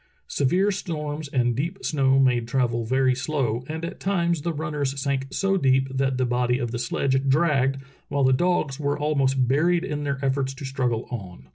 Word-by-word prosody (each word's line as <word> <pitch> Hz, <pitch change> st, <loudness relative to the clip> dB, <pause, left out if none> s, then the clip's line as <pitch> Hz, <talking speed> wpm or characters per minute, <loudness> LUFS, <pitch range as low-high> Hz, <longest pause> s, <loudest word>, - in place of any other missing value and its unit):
Severe 180 Hz, +9 st, +2 dB
storms 150 Hz, -5 st, -4 dB
and 120 Hz, -4 st, +1 dB
deep 170 Hz, +9 st, -3 dB
snow 135 Hz, -3 st, +2 dB
made 125 Hz, -3 st, +3 dB
travel 120 Hz, -2 st, 0 dB
very 130 Hz, +2 st, +2 dB
slow, 130 Hz, -3 st, -1 dB
and 160 Hz, +2 st, -4 dB
at 170 Hz, -, -7 dB
times 170 Hz, -4 st, 0 dB
the 170 Hz, -, -1 dB
runners 145 Hz, -3 st, -3 dB
sank 135 Hz, -1 st, -1 dB
so 195 Hz, +6 st, 0 dB
deep 135 Hz, -3 st, +2 dB
that 135 Hz, -1 st, 0 dB
the 130 Hz, -, +1 dB
body 125 Hz, 0 st, +1 dB
of 120 Hz, -3 st, -3 dB
the 120 Hz, -, -3 dB
sledge 135 Hz, +3 st, 0 dB
dragged, 135 Hz, -3 st, +2 dB, 0.3 s
while 140 Hz, -1 st, 0 dB
the 130 Hz, 0 st, +4 dB
dogs 155 Hz, -2 st, +1 dB
were 145 Hz, 0 st, 0 dB
almost 135 Hz, -4 st, +1 dB
buried 170 Hz, +7 st, +2 dB
in 150 Hz, -5 st, -3 dB
their 140 Hz, -1 st, -1 dB
efforts 135 Hz, 0 st, 0 dB
to 135 Hz, -, -8 dB
struggle 125 Hz, -4 st, -1 dB
on. 90 Hz, -, -8 dB
135 Hz, 185 wpm, -24 LUFS, 130-150 Hz, 0.3 s, the